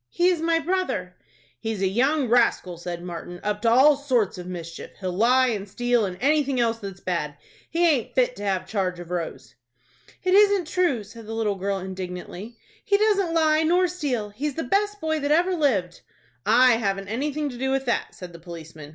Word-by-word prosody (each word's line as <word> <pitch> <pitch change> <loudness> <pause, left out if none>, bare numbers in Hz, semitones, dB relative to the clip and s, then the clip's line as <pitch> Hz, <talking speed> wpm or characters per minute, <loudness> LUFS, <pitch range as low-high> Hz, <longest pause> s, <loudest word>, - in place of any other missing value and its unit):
"He 350 +1 +2
is 350 -3 0
my 330 0 +2
brother." 330 - -2 0.4
"He's 225 -3 -3
a - - +3
young 265 +8 +1
rascal," 230 -6 +2
said 175 0 -5
Martin, 175 0 -7
"up 210 0 -2
to 230 - +3
all 270 +5 +6
sorts 250 -9 0
of 180 - -7
mischief. 170 -2 -7
He'll 185 -2 -3
lie 250 +6 +4
and 205 -3 -3
steal, 245 +2 +1
and 180 -1 -7
anything 280 0 +2
else 230 -1 +1
that's 195 -4 -8
bad. 150 -7 -3 0.3
He 340 +1 +2
aint 280 -8 0
fit 250 -1 +2
to 205 - -7
have 190 -2 -1
charge 185 -3 -2
of 175 0 -9
Rose." 170 -2 -5 0.7
"It 370 0 +2
isn't 405 -2 +5
true," 340 - +1
said 220 +2 -12
the 225 - -5
little 220 -2 0
girl, 195 +1 -2
indignantly. 190 +3 -7 0.3
"He 400 - +3
doesn't 400 -5 +2
lie 310 -1 +3
nor 355 +3 +3
steal. 280 - -2
He's 270 +7 -4
the 325 - -2
best 415 +8 0
boy 315 -2 -1
that 285 0 -2
ever 345 +5 +3
lived." 230 - 0 0.5
"I 250 -2 +6
haven't 195 -3 -2
anything 290 +6 -2
to 250 - -8
do 265 +1 -1
with 270 0 0
that," 240 - -1
said 180 -2 -9
the 170 - -11
policeman. 165 -3 -10
235 Hz, 200 wpm, -24 LUFS, 190-305 Hz, 0.7 s, all